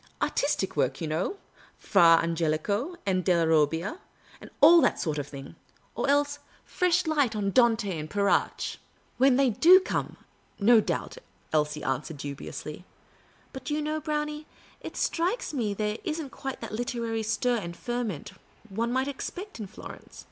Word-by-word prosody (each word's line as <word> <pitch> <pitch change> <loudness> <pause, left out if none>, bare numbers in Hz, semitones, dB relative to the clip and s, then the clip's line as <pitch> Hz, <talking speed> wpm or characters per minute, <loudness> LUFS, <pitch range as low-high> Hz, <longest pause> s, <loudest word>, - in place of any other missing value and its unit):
Artistic 280 -9 0
work, - - +2
don't - - -14
you 160 - -2
know 165 - -1 0.2
— - - -26
Fra 165 -1 +5
Angelico, 170 - -1
and 185 -2 +1
Delia 170 -2 +3
Robbia, 160 - +1 0.4
and - - -11
all 330 +3 +8
that - - +2
sort 155 -3 -1
of 145 - -4
thing; 140 -2 -10 0.4
or - - -1
else 285 0 +2 0.3
fresh 360 0 +1
light 290 -8 +1
on 200 -2 -1
Dante 225 -7 +2
and 155 0 -6
Petrarch! 200 +2 0
" - - -35
" - - -37
When 265 0 +5
they 270 -2 +3
do 350 - +7
come, 375 - -3 0.4
no 220 +2 +6
doubt," - - -3 0.3
Elsie 150 -1 0
answered, 135 +4 -3
du 140 0 -5
biously. 150 +4 -8 0.3
" - - -32
But 265 - -8
do 295 - -1
you 305 - -1
know, 310 +1 -2
Brownie, 300 0 -3 0.3
it - - -8
strikes 355 +5 -1
me 220 -7 -1
there 210 +1 -2
is 320 0 -2
n't 285 -5 -6
quite 270 -1 -6
that 230 - -6
literary 230 -1 -2
stir 235 +3 0
and 170 -5 -6
ferment 240 -10 -4 0.4
one 230 +4 -2
might 260 +2 0
expect 355 - -6
in 210 - -5
Florence. - - -11
225 Hz, 175 wpm, -27 LUFS, -, 0.4 s, all